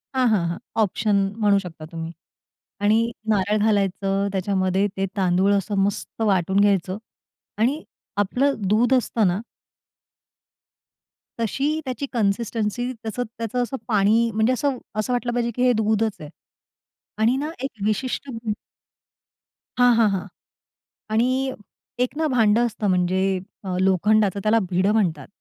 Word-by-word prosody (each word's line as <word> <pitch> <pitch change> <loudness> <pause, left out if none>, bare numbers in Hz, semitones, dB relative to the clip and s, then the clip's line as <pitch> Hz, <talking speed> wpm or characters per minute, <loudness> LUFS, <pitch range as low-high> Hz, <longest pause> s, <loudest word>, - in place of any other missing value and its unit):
हां, 255 -1 +3
हां, 195 -6 +2
हां 170 - -3 0.2
ऑप्शन 210 +1 +1 0.2
म्हणू 205 -2 +3
शकता 165 -4 -9
तुम्ही. 165 0 -5 0.7
आणि 220 +3 +3 0.2
नारळ 205 +1 +2
घालायचं 200 -1 +1
त्याच्यामध्ये. 190 0 +1
ते 195 0 0
तांदूळ 190 +1 +3
असं 200 +1 -1
मस्त 205 +2 -3
वाटून 195 -2 +2
घ्यायचं 195 -1 +2 0.6
आणि 270 +8 +1 0.3
आपलं 250 +8 +1
दूध 235 +5 +3
असतं 230 -4 +2
ना 180 +4 0 2.0
तशी 285 +8 0
त्याची 260 +2 -3
कन्सिस्टन्सी 230 +2 -1
त्याचं 225 0 -5 0.2
त्याचं 230 +2 -1
असं 265 +2 -3
पाणी 220 +2 +3
म्हणजे 220 +4 +3
असं, 275 0 0 0.2
असं 215 +4 -1
वाटलं 245 -1 -1
पाहिजे 235 -1 0
की 250 - -1
हे 250 - +5
दूधचं 220 -3 0
आहे 150 - -10 0.9
आणि 235 +4 +4
ना 295 +3 -2
एक 275 - -1 0.2
विशिष्ट 255 +5 -2
दूध 225 -3 -3 1.2
हां, 245 -1 +6
हां, 225 -2 +5
हां 195 0 -2 0.8
आणि 225 +3 +3 0.8
एक 265 - -6
ना 315 0 +1
भांडं 225 +1 +4
असतं 215 -2 -3
म्हणजे 180 0 +2 0.4
अ, 185 -1 -2
लोखंडाचं 200 +1 +3
त्याला 220 +2 +3
भिडं 185 +3 +2
म्हणतात. 195 -7 0
215 Hz, 135 wpm, -23 LUFS, 195-240 Hz, 2.0 s, हां